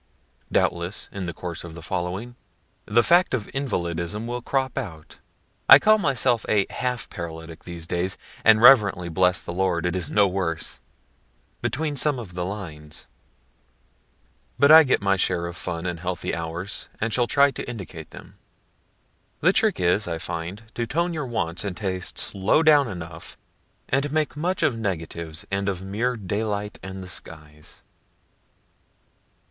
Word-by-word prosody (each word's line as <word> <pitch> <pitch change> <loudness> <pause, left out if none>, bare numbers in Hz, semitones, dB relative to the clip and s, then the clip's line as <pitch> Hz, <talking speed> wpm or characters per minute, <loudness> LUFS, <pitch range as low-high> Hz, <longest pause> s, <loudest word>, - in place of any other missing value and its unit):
Doubtless 85 +3 0
in 95 -3 -5
the - - -2
course 85 +1 -6
of 85 -2 -9
the 85 - -10
following, 90 +8 -3 0.5
the 120 +3 +4
fact 175 -4 +4
of 110 -5 -4
invalidism 90 -6 -2
will 120 +1 -3
crop 130 +1 -1
out, 85 - -7 0.5
(I 135 - +13
call 215 +7 +4
myself 130 - +1
a 100 -2 +3
half 125 -2 -2
Paralytic 80 -1 -8
these 85 -2 -8
days, 90 +2 -1 0.3
and 110 0 +6
reverently 105 -9 +6
bless 90 +2 +2
the 85 - -5
Lord 90 -2 0
it 90 0 0
is 90 -4 -2
no 100 -1 +4
worse,) 90 -4 -3 0.8
between 150 +1 -1
some 145 0 +1
of 110 -7 -8
the 90 0 -3
lines 85 -6 -7 1.5
but 140 +1 +6
I 160 +1 +11
get 130 -8 +1
my 95 -1 +3
share 90 -2 0
of 85 0 -6
fun 85 -2 -4
and 90 -2 -3
healthy 90 +1 -3
hours, 85 +4 -5
and 115 0 -1
shall 120 -1 +2
try 140 +2 +4
to 125 - -6
indicate 90 -9 -8
them. - - -13 1.0
(The - - +5
trick - - +2
is, 90 +4 +2
I 85 -1 -2
find, 85 +5 -5
to 120 -1 -2
tone 170 +6 0
your 150 -4 -3
wants 90 -7 -2
and 100 -3 -4
tastes 95 -4 -3
low 100 +11 +3
down 150 -3 +6
enough, 85 -4 -8 0.5
and 135 +2 0
make 155 -1 0
much 175 +5 -1
of 125 - +3
negatives, 85 -6 -4
and 100 0 0
of 95 -1 -4
mere 115 +6 -1
daylight 105 +1 -3
and 95 0 -7
the - - -9
skies.) 75 -3 -10
95 Hz, 160 wpm, -24 LUFS, 85-120 Hz, 1.5 s, I